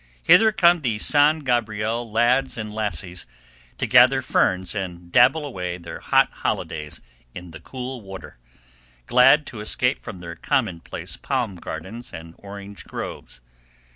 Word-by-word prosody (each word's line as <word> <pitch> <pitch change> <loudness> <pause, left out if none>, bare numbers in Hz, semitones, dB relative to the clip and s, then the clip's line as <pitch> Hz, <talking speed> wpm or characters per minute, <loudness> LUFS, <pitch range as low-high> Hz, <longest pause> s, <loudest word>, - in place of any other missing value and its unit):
Hither 220 - +6
come 175 -4 +4
the 115 -6 -1
San 150 +7 +3
Gabriel 115 -2 -1
lads 125 +4 +2
and 105 -1 -5
lassies, 90 -5 -4 0.5
to - - -1
gather - - +5
ferns 95 -1 +1
and 90 -4 -6
dabble 135 - +4
away 90 -9 -5
their 85 -1 -9
hot - - +2
holidays 75 -1 -4 0.3
in 90 -1 -9
the 80 - -10
cool 125 - -7
water, 95 - -11 0.7
glad 125 - +5
to 115 - -8
escape 125 +4 0
from 95 - -9
their 85 -1 -8
commonplace 85 0 -3
palm 125 -8 -2
gardens 115 +7 -8
and 80 0 -10
orange 100 0 -10
groves. 60 - -8
105 Hz, 140 wpm, -23 LUFS, 90-125 Hz, 0.7 s, Hither